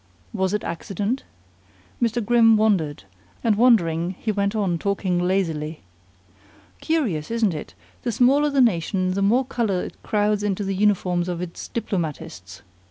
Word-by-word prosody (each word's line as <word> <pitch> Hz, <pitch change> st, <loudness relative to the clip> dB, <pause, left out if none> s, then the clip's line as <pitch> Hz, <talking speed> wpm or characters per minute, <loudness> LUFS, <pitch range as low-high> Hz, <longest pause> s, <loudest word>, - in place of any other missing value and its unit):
Was 190 Hz, -1 st, 0 dB
it 210 Hz, +1 st, -1 dB
accident? 200 Hz, +8 st, -3 dB, 0.8 s
Mr. 235 Hz, -1 st, 0 dB
Grimm 225 Hz, -1 st, +5 dB
wondered, 185 Hz, -, +1 dB, 0.4 s
and 225 Hz, -3 st, +3 dB
wondering 185 Hz, -7 st, +3 dB
he 220 Hz, -, -2 dB
went 200 Hz, 0 st, -1 dB
on 190 Hz, -6 st, 0 dB
talking 190 Hz, -2 st, 0 dB
lazily: 165 Hz, -4 st, -1 dB, 1.0 s
"Curious, 230 Hz, -, -1 dB
isn't 225 Hz, -5 st, +1 dB
it, 150 Hz, -, -7 dB, 0.3 s
the 240 Hz, -, -2 dB
smaller 275 Hz, +6 st, +3 dB
the 280 Hz, -2 st, +2 dB
nation 185 Hz, -4 st, +1 dB
the 195 Hz, +2 st, -1 dB
more 235 Hz, +7 st, +3 dB
color 220 Hz, -8 st, -1 dB
it -, -, -9 dB
crowds 210 Hz, -1 st, +1 dB
into 205 Hz, -1 st, -1 dB
the 195 Hz, 0 st, -2 dB
uniforms 185 Hz, -3 st, +1 dB
of 175 Hz, -1 st, -3 dB
its 175 Hz, -1 st, -6 dB
diplomatists? 160 Hz, -, -5 dB
200 Hz, 145 wpm, -23 LUFS, 175-225 Hz, 1.0 s, Grimm